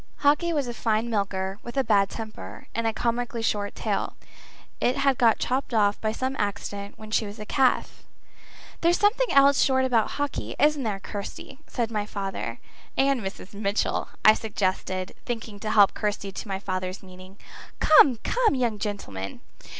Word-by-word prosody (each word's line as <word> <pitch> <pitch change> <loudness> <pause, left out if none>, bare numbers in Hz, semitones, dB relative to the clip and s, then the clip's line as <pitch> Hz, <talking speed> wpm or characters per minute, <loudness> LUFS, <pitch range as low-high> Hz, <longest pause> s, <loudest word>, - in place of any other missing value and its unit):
Hawkie 300 +4 +3
was 290 -4 0
a 240 - -4
fine 225 0 0
milker, 195 -2 -1
with 240 +3 -8
a 270 - +3
bad 200 -4 +3
temper, 220 0 -8
and 230 0 -1
a - - +2
comically 235 +1 -1
short 205 -2 -1
tail. - - -2 0.6
It 250 - +1
had 275 -2 +2
got 230 -3 +5
chopped 255 -1 -1
off 205 -2 +2
by 215 - 0
some 260 +4 -2
accident 200 0 -3
when 215 0 -11
she 215 0 +1
was 205 +2 -9
a 210 - -7
calf. 260 +3 +1 0.8
"There's 345 +1 +4
something 445 +5 +3
else 280 0 +5
short 260 -1 +3
about 235 -4 +1
Hawkie 285 -1 -3
isn't 295 0 +3
there, 210 -5 -2
Kirsty?" 205 +8 -7
said 235 -3 -2
my 210 -2 -2
father. 195 -2 -4 0.4
"And 275 -2 +3
Mrs. 190 0 -7
Mitchell," 200 0 -1 0.2
I 215 - +10
suggested, 185 -3 -2
thinking 225 -4 -5
to 215 - -4
help 205 -2 +6
Kirsty 205 -1 -2
to 205 - -7
my 195 -1 -2
father's 185 -1 -4
meaning. 185 +1 -13 0.4
"Come, 300 -4 +7
come, 470 - +2
young 235 -5 0
gentleman! 100 - -5
220 Hz, 170 wpm, -26 LUFS, 200-260 Hz, 0.8 s, I